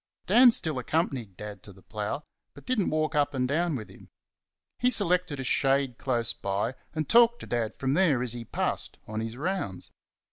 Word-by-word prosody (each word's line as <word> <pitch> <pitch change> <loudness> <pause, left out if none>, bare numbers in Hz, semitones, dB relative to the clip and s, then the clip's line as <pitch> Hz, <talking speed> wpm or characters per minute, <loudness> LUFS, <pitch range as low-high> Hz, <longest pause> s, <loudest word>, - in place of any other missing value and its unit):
Dan 240 +8 +7
still 160 - 0
accompanied 125 - -2
Dad 105 -2 -8
to 100 - -11
the 95 0 -18
plough; 105 +7 -4 0.3
but - - -14
did 255 -2 0
n't 195 - +1
walk 155 +1 0
up 145 -1 +1
and 125 -1 +1
down 160 +3 0
with 110 -5 -6
him. - - -16 0.7
He 250 - +3
selected 180 - +1
a - - -3
shade 135 -1 +1
close 120 -3 +1
by, 100 +5 -2 0.2
and 155 -2 -2
talked 235 +1 +5
to - - -7
Dad 115 -2 -2
from 135 0 -1
there 155 -7 +3
as 120 -2 -2
he 120 -1 -6
passed - - -3
on 110 0 -4
his 115 +1 -5
rounds. 155 - -3
135 Hz, 200 wpm, -28 LUFS, 115-170 Hz, 0.7 s, Dan